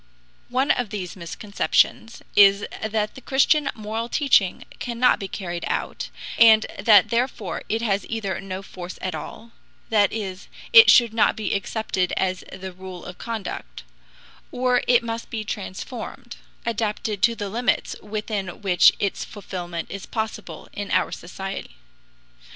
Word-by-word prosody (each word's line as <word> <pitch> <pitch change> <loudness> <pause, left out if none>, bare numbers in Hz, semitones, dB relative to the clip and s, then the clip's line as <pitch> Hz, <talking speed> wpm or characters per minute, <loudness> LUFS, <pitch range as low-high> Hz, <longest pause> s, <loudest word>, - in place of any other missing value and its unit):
One 260 +3 +2
of 245 -4 0
these 190 -4 -5
misconceptions 200 +5 0
is 200 0 +6 0.2
that 215 -1 -1
the 265 - -11
Christian 275 +3 +3
moral 220 +2 -4
teaching 240 -11 +3 0.2
cannot 245 0 +2
be 195 - -4
carried 175 -3 -5
out, - - -3 0.3
and 220 -1 +7
that 210 -5 +6
therefore 235 -4 -1
it 225 +2 0
has 200 -3 0
either 200 -5 -3
no 195 0 -6
force 180 -1 -8
at 185 - -3
all 230 +1 -8 0.4
that 205 -2 +4
is, 195 -3 -5 0.3
it 465 0 +10
should 235 -3 +6
not 225 - +3
be 215 - -2
accepted 200 -2 -1
as 185 -1 0
the 190 0 -7
rule 185 -1 -9
of 180 - -9
conduct 225 -3 -6 0.7
or 250 -1 +2
it 245 -1 +5
must 230 0 -5
be 220 -2 -3
transformed, 220 +4 -6 0.3
adapted 215 -2 -2
to 230 +2 +4
the 205 -2 -4
limits 235 +5 0
within 210 -2 -4
which 180 -3 +6
its 200 -1 -1
fulfillment 175 -4 -6
is 195 -1 -7
possible 220 -1 -5
in 205 -1 -5
our - - +1
society. 195 +3 -6
210 Hz, 145 wpm, -23 LUFS, 190-230 Hz, 0.7 s, it